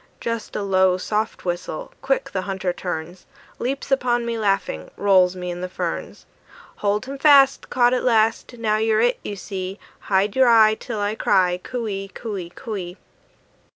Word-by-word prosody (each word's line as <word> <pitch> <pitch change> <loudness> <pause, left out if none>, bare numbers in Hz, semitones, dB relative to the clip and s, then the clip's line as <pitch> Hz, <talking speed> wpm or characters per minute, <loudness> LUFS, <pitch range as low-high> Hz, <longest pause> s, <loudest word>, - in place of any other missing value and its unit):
Just 230 -2 -4
a 205 - -2
low, 190 -2 +3
soft 210 +3 -2
whistle, 175 - -4
quick - - -1
the 190 - -1
hunter 190 -1 -2
turns, 175 0 -6 0.3
Leaps 270 +3 -3
upon 240 -3 +1
me 235 0 -2
laughing, 195 - -1
rolls 185 -2 +4
me 180 -1 -4
in 175 0 -6
the 185 - -4
ferns. - - -5 0.5
"Hold 205 +3 0
him 275 +1 -7
fast, 275 -2 +5
"Caught 245 0 +3
at 255 - 0
last! 225 0 +1
"Now 215 -2 +1
you're 220 0 +2
it, 245 +2 +2
you 205 - -5
see. 190 -1 -5 0.2
"Hide 200 +1 +1
your 260 -1 +5
eye, 220 -2 +6
"Till 220 - -5
I 205 +1 0
cry, 185 -4 +2
"Coo 240 +1 -4
ee, 195 -1 -4
coo 225 -3 -6
ee, 175 -3 -5
coo 215 +5 -7
ee!" 180 -1 -6
210 Hz, 180 wpm, -22 LUFS, 185-235 Hz, 0.5 s, eye